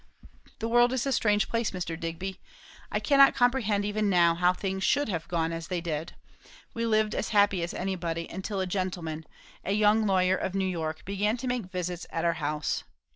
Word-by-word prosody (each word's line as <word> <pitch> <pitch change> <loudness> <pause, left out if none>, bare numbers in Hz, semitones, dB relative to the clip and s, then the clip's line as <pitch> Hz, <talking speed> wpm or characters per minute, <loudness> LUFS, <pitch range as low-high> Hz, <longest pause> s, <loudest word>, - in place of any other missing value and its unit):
"The 225 - -3
world 240 +2 +4
is 260 0 -1
a 275 - 0
strange 210 -4 +2
place, 230 -1 0
Mr. 175 -3 -4
Digby! 170 +3 -5 0.5
I - - 0
cannot 275 -2 +5
comprehend, 245 -5 +2
even 210 0 0
now, 170 -3 +5
how 180 +1 +3
things 190 +1 -3
should 290 - +2
have 165 -4 -3
gone 165 -2 -1
as 165 -1 -5
they 180 -2 -2
did. 165 -1 -4 0.6
We 230 0 -1
lived 215 -1 +2
as - - -2
happy 200 -3 +3
as 170 - -2
anybody; 170 -3 -3
until 190 +2 -4
a - - 0
gentleman, 175 -4 -3 0.4
a 195 - -1
young 210 +1 +3
lawyer 185 -1 +3
of 190 0 -3
New 195 -1 +1
York, 160 -4 -3
began 205 +4 0
to 255 +2 -5
make 250 -4 -1
visits 180 -1 -4
at 165 - -2
our 170 - +3
house. 150 0 -1
190 Hz, 195 wpm, -28 LUFS, 170-215 Hz, 0.6 s, cannot